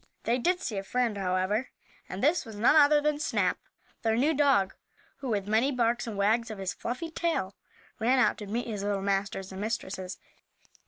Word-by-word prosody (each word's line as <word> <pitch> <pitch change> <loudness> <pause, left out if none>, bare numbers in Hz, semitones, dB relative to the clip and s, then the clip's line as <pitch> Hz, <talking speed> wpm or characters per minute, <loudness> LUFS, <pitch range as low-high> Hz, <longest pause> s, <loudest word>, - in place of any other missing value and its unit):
They 240 +2 +1
did 360 +8 +1
see 215 - -3
a - - -6
friend, 240 +2 0
however, 190 +5 0 0.4
and 185 - -5
this 315 +5 +3
was 225 -3 -10
none 225 +8 +4
other 295 -1 +6
than 300 0 0
Snap, 305 - 0 0.4
their 225 -1 +1
new 295 +6 +3
dog, 270 -10 +3 0.4
who, 265 - -5
with 205 -3 -1
many 225 +6 +2
barks 240 -2 0
and 215 -3 -5
wags 220 +4 +2
of 215 - -6
his 190 -1 -3
fluffy 285 +8 -5
tail, 320 - -1 0.5
ran 245 +4 +3
out 255 - +3
to 210 - -7
meet 230 +4 -2
his 210 -4 -4
little 200 -1 -1
masters 195 -1 -1
and 190 +1 -6
mistresses. 190 -4 -4
225 Hz, 195 wpm, -29 LUFS, 200-260 Hz, 0.5 s, other